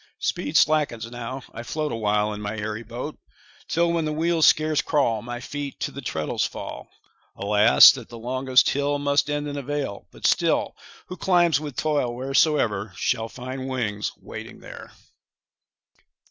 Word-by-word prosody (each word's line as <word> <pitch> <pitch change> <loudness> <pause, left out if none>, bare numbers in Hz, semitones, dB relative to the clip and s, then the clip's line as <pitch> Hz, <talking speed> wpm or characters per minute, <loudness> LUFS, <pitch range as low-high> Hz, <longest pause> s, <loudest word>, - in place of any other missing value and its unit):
Speed 150 - -1
slackens 145 -7 +2
now, 125 +2 -6
I 115 - -6
float 150 +5 -3
Awhile 105 -2 0
in 105 - -7
my 105 +1 -4
airy 105 +1 -4
boat; 120 +6 -7 0.5
Till, 170 +1 +1
when 165 -1 0
the 155 - -1
wheels 165 +1 +2
scarce 155 -1 +3
crawl, 120 -8 +1
My 120 +1 -6
feet 145 +2 -6
to - - -2
the 140 - -8
treadles 80 - -2
fall. - - -6 0.5
20 100 - -6
Alas, 105 -10 +8
that - - -8
the 120 - -9
longest 130 +2 +2
hill 145 +1 0
Must 145 0 +1
end 145 0 -2
in 145 0 -5
a - - -3
vale; 140 -6 -4
but - - -10
still, - - +2 0.3
Who 180 - -8
climbs 175 -4 +3
with 145 -4 -7
toil, 145 -6 0
wheresoe'er, 125 - +1
Shall 115 +2 -1
find 130 +2 -6
wings 105 -6 -2
waiting - - -9
there. - - -11
130 Hz, 165 wpm, -24 LUFS, 115-150 Hz, 0.5 s, Alas